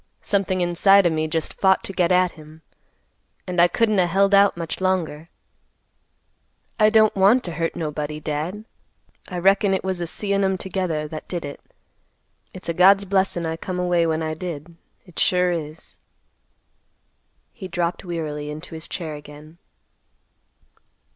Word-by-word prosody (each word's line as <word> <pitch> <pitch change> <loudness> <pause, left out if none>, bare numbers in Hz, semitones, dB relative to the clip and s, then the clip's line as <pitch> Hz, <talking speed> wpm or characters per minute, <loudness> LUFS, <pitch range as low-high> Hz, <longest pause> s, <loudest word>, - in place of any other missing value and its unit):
Something 195 -2 0
inside 190 +3 +4
o' 170 - +3
me 155 0 -1
just 160 0 -2
fought 190 -1 +2
to 195 - -6
get 180 -1 +1
at 180 -1 +3
him, 155 0 -15 0.8
and 180 -1 +1
I 175 - +7
couldn't 215 +3 +1
a 180 - +3
held 195 +3 +2
out 200 -2 +5
much 165 +1 -5
longer. 175 -4 -1 1.5
I 215 0 +6
don't 220 -1 +4
want 200 +6 +4
to 175 - -4
hurt 165 +1 -2
nobody, 150 -1 -4
Dad. 160 +8 -4 0.6
I 180 - -6
reckon 195 +2 +3
it - - -3
was 185 -2 -2
a 170 - -2
seein' 200 +3 -1
'em 190 -1 +1
together 180 -5 -3
that 155 0 -8
did 175 -4 -4
it. 140 - -8 0.9
It's 185 - -10
a 170 - -1
God's 195 +3 +5
blessin' 190 -3 0
I 160 0 -3
come 180 +2 -5
away 175 -2 +2
when 160 0 -1
I 155 0 -2
did; 165 -1 -7 0.3
it 180 -3 -10
sure 180 0 +2
is." 160 -1 -6 1.5
He 195 -6 -9
dropped 170 -1 -2
wearily 155 -4 -4
into 155 +3 -8
his 160 0 -7
chair 165 -4 -5
again. 150 +2 -12
175 Hz, 160 wpm, -22 LUFS, 160-190 Hz, 1.5 s, I